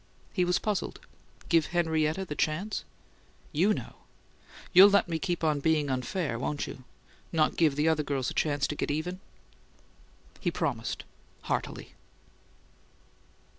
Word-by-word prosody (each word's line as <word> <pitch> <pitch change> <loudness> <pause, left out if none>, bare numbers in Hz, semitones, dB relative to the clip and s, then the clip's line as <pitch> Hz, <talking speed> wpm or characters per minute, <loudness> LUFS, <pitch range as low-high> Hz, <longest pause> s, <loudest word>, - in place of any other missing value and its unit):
He 180 -3 +2
was 180 0 +2
puzzled. 210 -3 -2 0.5
"Give 165 -3 +3
Henrietta 160 +1 +1
the 150 - -5
chance?" 160 +8 -1 0.7
"YOU 175 +7 +3
know! - - -4 0.8
You'll 195 +2 +10
let 200 -2 +3
me 165 -2 -2
keep 175 -2 -2
on 155 -2 +2
being 150 -1 +1
unfair, 130 0 -2
won't 145 +3 -2
you? 130 - -9 0.5
Not 155 -2 +2
give 155 -4 +3
the 150 +2 +1
other 160 -1 +3
girls 140 -3 -2
a - - -6
chance 145 -2 +1
to 150 - -2
get - - -2
even?" 165 +5 -2 1.2
He - - 0
promised, - - -2 0.4
heartily. - - -3
160 Hz, 135 wpm, -29 LUFS, 145-180 Hz, 1.2 s, You'll